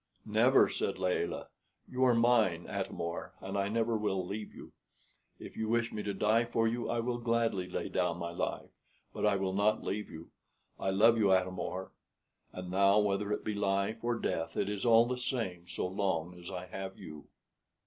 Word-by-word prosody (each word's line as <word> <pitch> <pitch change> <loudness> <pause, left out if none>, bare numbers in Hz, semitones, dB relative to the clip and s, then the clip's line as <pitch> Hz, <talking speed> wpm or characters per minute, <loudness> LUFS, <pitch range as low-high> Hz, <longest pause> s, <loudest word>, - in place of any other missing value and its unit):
"Never," - - +5
said - - -2
Layelah; 90 -1 -1 0.4
"you 130 0 -1
are 125 -2 +5
mine, 115 -8 +3
Atam - - -4
or, 85 0 -4
and 95 +1 -6
I 100 0 +1
never 115 +2 0
will 95 -4 -1
leave 105 +3 -5
you. - - -12 0.7
If - - -10
you 110 -1 -2
wish 115 0 +1
me 105 - -3
to 105 - -2
die 110 +4 +2
for 115 -1 +1
you, 120 +1 -2
I 120 - 0
will 120 +1 -1
gladly 115 -6 0
lay - - -3
down 90 -2 0
my 85 0 -4
life; 85 - -3 0.4
but - - 0
I 105 - +3
will 95 -1 -1
not 105 +2 +2
leave 105 +2 -3
you. 80 +1 -10 0.5
I 95 - -1
love 110 +4 +5
you, 100 -3 +4
Atam 95 0 +2
or; 95 +2 -4 0.6
and 90 -1 -7
now, 100 +2 +4
whether 105 0 +1
it 105 - -1
be 110 - -1
life 100 +2 0
or 120 0 +1
death, 80 -7 -2
it 100 - 0
is 105 +3 -2
all 115 0 +7
the 125 +1 -3
same 100 -9 -3
so - - -3
long 90 -3 -1
as 85 - -9
I 90 -1 -5
have 95 +1 -7
you." 75 -1 -10
100 Hz, 200 wpm, -32 LUFS, 95-115 Hz, 0.7 s, all